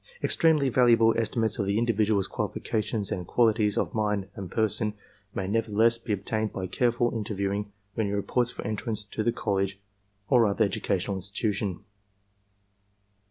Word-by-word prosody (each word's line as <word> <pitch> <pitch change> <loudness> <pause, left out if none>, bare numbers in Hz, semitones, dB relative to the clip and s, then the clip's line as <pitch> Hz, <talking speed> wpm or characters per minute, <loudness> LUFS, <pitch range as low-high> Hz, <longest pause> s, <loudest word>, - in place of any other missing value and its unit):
Extremely 155 -4 +3
valuable 115 -2 +5
estimates 115 -1 0
of 100 - 0
the 100 +1 +1
individual's 110 -4 +2
qualifications 110 -2 -2
and 90 -2 -3
qualities 110 -3 +2
of - - -1
mind 105 -3 -1
and 95 -3 -7
person 110 0 +1 0.4
may 95 - -2
nevertheless 115 +2 +2
be 115 - -6
obtained 110 +2 -1
by 95 - -4
careful 120 +4 +1
inter 105 -1 -3
viewing 100 +1 -2 0.2
when 110 -1 -1
he - - -2
reports 120 +4 0
for - - -7
entrance 110 0 -2
to 105 - -4
the 120 - +2
college 100 -4 -1 0.5
or 120 -4 +5
other 105 +2 +2
educational 100 0 -1
institution. 100 0 -2
105 Hz, 150 wpm, -27 LUFS, 100-115 Hz, 0.5 s, valuable